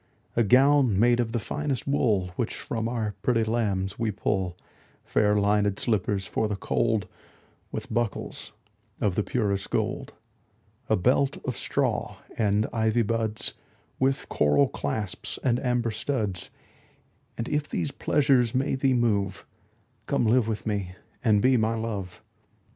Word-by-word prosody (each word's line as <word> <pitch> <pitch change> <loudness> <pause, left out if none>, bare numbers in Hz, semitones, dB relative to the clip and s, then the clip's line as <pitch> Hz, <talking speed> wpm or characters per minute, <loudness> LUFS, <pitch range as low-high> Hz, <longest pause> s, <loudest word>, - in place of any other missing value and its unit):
A 120 - +3
gown 130 -1 +5
made 120 +2 +4
of 115 -2 0
the 120 - 0
finest 140 +2 -3
wool 110 -10 +1
Which 120 - -2
from 120 -5 -3
our 110 -3 -2
pretty 115 -2 +2
lambs 100 -4 -1
we 115 -2 +1
pull; 95 -3 -1 0.5
Fair 105 0 +2
linèd 105 -1 +2
slippers 100 -3 0
for 110 - -1
the 105 - -2
cold, 110 +1 0
15 - - -20 0.6
With - - -5
buckles 120 -4 -2 0.5
of 100 - +1
the 105 - +1
purest 100 -4 -1
gold. - - -2 0.8
A - - +4
belt 130 +8 +2
of 125 - -2
straw - - -1 0.2
and 105 0 +2
ivy 110 0 +2
buds 110 0 -2 0.5
With 135 +1 +1
coral 75 -1 +3
clasps 95 +7 -3
and 120 -2 +2
amber 125 -3 0
studs: 105 -6 -2 0.9
And 115 - -3
if 150 0 -1
these 145 - -2
pleasures 135 -7 +2
may 135 +3 +1
thee 135 -1 +2
move, 105 -5 0 0.6
Come - - +1
live 115 +1 +3
with 110 -3 -3
me 100 -4 -2 0.3
and 105 -4 +3
be 130 0 +5
my 110 0 +1
Love. 100 -5 -5
110 Hz, 145 wpm, -26 LUFS, 100-125 Hz, 0.9 s, gown